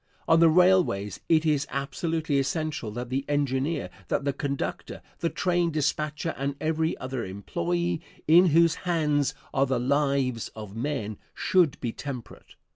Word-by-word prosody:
On 165 - +5
the 165 -1 +7
railways 180 - +3
it 160 -1 +4
is 150 -3 +1
absolutely 150 +2 -1
essential 150 -3 -2
that 120 +1 -5
the 135 +1 0
engineer, 145 - 0 0.2
that 140 - -1
the 140 - +1
conductor, 140 0 -4 0.2
the 165 - 0
train 175 -1 +1
dispatcher 150 +1 -1
and 140 +1 -1
every 160 +1 0
other 130 -2 -4
employee, 170 - -2 0.3
in 175 +4 +7
whose 165 +1 +5 0.2
hands 150 -4 +1 0.2
are 135 +1 +2
the 130 - +1
lives 135 -2 +1
of 105 -2 -8
men, 115 -5 -3 0.2
should 175 -7 +2
be 120 - -2
temperate. 130 -2 -8
145 Hz, 145 wpm, -27 LUFS, 135-165 Hz, 0.3 s, the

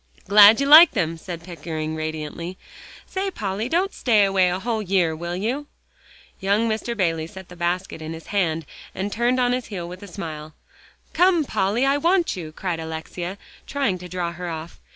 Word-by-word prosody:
"Glad 210 +3 +8
you 275 - +1
like 310 +4 +9
them," 165 -7 0
said 170 0 -8
Pickering 160 -3 -5
radiantly. 155 +3 -5 0.5
"Say, 385 +1 -3
Polly, 215 - -3
don't 370 +5 +1
stay 215 -5 +3
away 190 -2 +3
a 180 - -1
whole 220 +2 -2
year, 180 -5 +1
will 170 +2 -4
you?" 245 +10 -2 0.7
Young 200 +4 +1
Mr. 225 +2 -2
Bayley 165 -4 0
set 190 +1 -11
the 180 - -11
basket 175 -1 -2
in 160 +1 -5
his 165 0 -10
hand 165 -5 0 0.3
and 200 +2 -3
turned 240 +3 +1
on 245 -1 +2
his 250 -1 -3
heel 180 -5 -5
with 180 +1 -9
a 205 - -9
smile. 155 -5 -7 0.6
"Come, 355 -4 +4
Polly, 215 +3 0
I 275 +1 +3
want 345 +3 +2
you," 165 -4 -7
cried 175 +1 -3
Alexia, 160 +3 -6 0.3
trying 270 -10 -1
to 180 0 -9
draw 175 -1 -2
her 175 +1 -6
off. 165 0 -7
190 Hz, 185 wpm, -23 LUFS, 170-230 Hz, 0.7 s, like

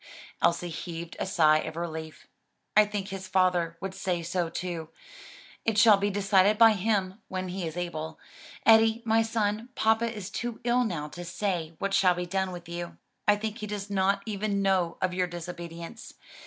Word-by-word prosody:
Elsie 175 +1 +2
heaved 165 +1 -6
a - - -2
sigh 155 -5 +4
of 160 0 -5
relief. 160 -2 -6 0.5
"I 215 0 +7
think 205 -1 -4
his 190 -1 -6
father 180 -3 +2
would 190 0 -4
say 180 -3 -2
so 175 0 -1
too; 170 -2 -4 0.7
it 225 -2 0
shall 215 -1 +7
be 200 +1 0
decided 200 0 +3
by 225 0 +8
him 200 -1 0
when 185 0 -4
he 180 -1 -3
is 160 +2 -7
able. 160 -2 -4 0.5
Eddie, 225 +1 +5
my 225 0 +4
son, 225 0 -1
papa 225 +1 +2
is 210 -4 -7
too 240 -1 -4
ill 245 +1 +3
now 160 -8 -3
to 175 +3 -8
say 175 -3 -2
what 200 0 -2
shall 190 -2 +4
be 180 0 -3
done 190 +1 -1
with 175 -1 -8
you. 170 0 -6 0.3
I 210 - +6
think 215 +1 -4
he 210 - -5
does 205 -1 -5
not 195 0 +2
even 205 -1 -1
know 185 -3 +1
of 185 -1 +1
your 180 0 +1
disobedience. 175 +3 -8
190 Hz, 180 wpm, -28 LUFS, 175-210 Hz, 0.7 s, by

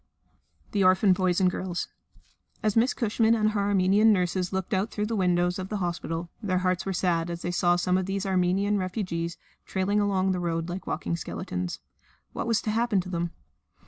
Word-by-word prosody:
The 200 -2 +2
Orphan 185 +1 +5
Boys 180 -1 +1
and 185 - +4
Girls 180 -1 -3 0.8
As 215 -2 +1
Miss 235 +3 +4
Cushman 225 -1 +2
and 215 -1 +2
her 210 - -1
Armenian 200 +2 +4
nurses 180 -2 0
looked 190 +1 -2
out 195 +3 +1
through 210 -2 -2
the 225 +1 -2
windows 180 -2 +1
of 185 0 -5
the 210 - -2
hospital, 170 -2 -3
their 190 -4 0
hearts 185 0 0
were - - 0
sad 175 -2 0
as 170 0 -5
they 175 - -1
saw 175 0 +3
some 180 +1 +1
of 185 - -3
these 195 +1 -2
Armenian 190 +2 +1
refugees 180 -3 -3 0.3
trailing 195 +2 0
along 195 -2 +1
the 180 - -1
road 165 -1 -2
like 180 +2 -6
walking 170 +1 -2
skeletons. 90 - -4 0.5
What - - -3
was 230 -2 +1
to 215 - -1
happen 230 -2 +1
to 185 - -9
them? 170 -1 -2
185 Hz, 195 wpm, -27 LUFS, 175-205 Hz, 0.8 s, Orphan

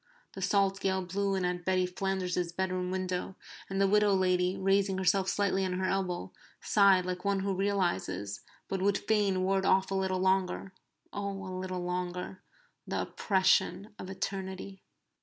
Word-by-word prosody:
The 195 - -7
salt 195 0 +2
gale 190 -1 0
blew 195 +2 -1
in 185 -1 0
at 180 0 -2
Betty 185 0 +2
Flanders's 180 -1 -2
bedroom 185 0 -2
window, 185 0 -3 0.3
and 195 0 -2
the 195 - +4
widow 210 0 +4
lady, 185 0 +2
raising 195 0 +2
herself 190 +1 +2
slightly 195 -1 +1
on 185 -1 -1
her 185 +1 -1
elbow, 185 -1 -1 0.3
sighed 195 -3 +4
like 180 0 -4
one 200 -1 +1
who 195 0 0
realizes, 180 - -1 0.3
but 195 -1 -2
would 200 +1 +3
fain 200 -4 +1
ward 190 0 +1
off 190 0 +3
a - - 0
little 190 -1 0
longer 190 0 0 0.4
oh, 200 -1 -4
a 185 - -6
little 185 -1 -4
longer! 180 +1 -4 0.5
the - - -1
oppression 195 +1 +1
of 185 - -7
eternity. 190 0 -5
190 Hz, 160 wpm, -30 LUFS, 185-195 Hz, 0.5 s, the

